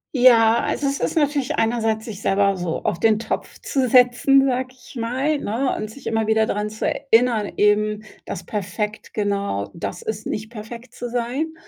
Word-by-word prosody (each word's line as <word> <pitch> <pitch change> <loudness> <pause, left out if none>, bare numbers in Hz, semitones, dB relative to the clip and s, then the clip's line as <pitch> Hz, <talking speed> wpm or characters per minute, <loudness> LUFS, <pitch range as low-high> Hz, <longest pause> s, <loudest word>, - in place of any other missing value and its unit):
Ja, 235 -2 +6
also 285 - -1
es 275 0 -1
ist - - -1
natürlich 290 -2 +1
einerseits, 225 -2 0
sich 215 -3 -8
selber 195 0 +2
so 175 -2 -3
auf 190 -5 -1
den 220 -1 +4
Topf 220 0 -4
zu 265 -3 0
setzen, 250 +3 +5
sage 260 -1 0
ich 250 0 -14
mal, 260 +6 0
ne, 250 +5 -1
und 215 - -4
sich 275 +6 -13
immer 225 -1 0
wieder 220 0 +3
daran 210 0 -2
zu 215 +1 -5
erinnern 230 -5 +2
eben, 210 +1 +2 0.2
dass - - -6
perfekt 210 +1 -4
genau 200 - -1
das 170 - -5
ist: 215 -1 -5
Nicht 215 +1 -4
perfekt 235 +2 -9
zu 245 -1 -6
sein. 250 +7 -2
225 Hz, 180 wpm, -22 LUFS, 210-250 Hz, 0.2 s, Ja